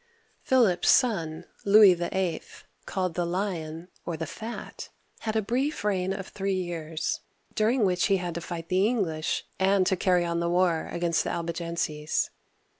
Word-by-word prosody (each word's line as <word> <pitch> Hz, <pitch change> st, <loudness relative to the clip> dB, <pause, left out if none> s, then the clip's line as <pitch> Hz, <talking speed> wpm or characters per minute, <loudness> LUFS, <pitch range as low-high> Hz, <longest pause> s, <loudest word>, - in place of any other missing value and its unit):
Philip's 230 Hz, -9 st, +3 dB
son, 175 Hz, -10 st, +2 dB, 0.2 s
Louis 205 Hz, -1 st, +8 dB
VIIL, 175 Hz, -1 st, -1 dB, 0.5 s
called 185 Hz, -3 st, -1 dB
the 175 Hz, -, -1 dB
Lion, 170 Hz, -2 st, -3 dB, 0.2 s
or 170 Hz, -2 st, -4 dB
the 160 Hz, -, -3 dB
Fat, 225 Hz, +9 st, -7 dB, 0.3 s
had 220 Hz, -1 st, -3 dB
a 220 Hz, -, +2 dB
brief 260 Hz, +7 st, -1 dB
reign 190 Hz, -3 st, 0 dB
of 195 Hz, -1 st, -4 dB
three 195 Hz, -1 st, -2 dB
years, 165 Hz, -3 st, -3 dB, 0.3 s
during 220 Hz, +1 st, +2 dB
which 180 Hz, -2 st, +2 dB
he 195 Hz, -2 st, +3 dB
had 175 Hz, -2 st, -4 dB
to 170 Hz, -, -4 dB
fight 165 Hz, -1 st, -6 dB
the 190 Hz, +2 st, +3 dB
English, 175 Hz, -10 st, -1 dB
and 190 Hz, 0 st, +3 dB
to 190 Hz, -, +2 dB
carry 180 Hz, -1 st, +2 dB
on 170 Hz, 0 st, -1 dB
the 170 Hz, 0 st, 0 dB
war 175 Hz, -2 st, +2 dB
against 170 Hz, -1 st, +1 dB
the -, -, -3 dB
Albigenses. 170 Hz, -2 st, -2 dB
180 Hz, 160 wpm, -27 LUFS, 170-200 Hz, 0.5 s, Louis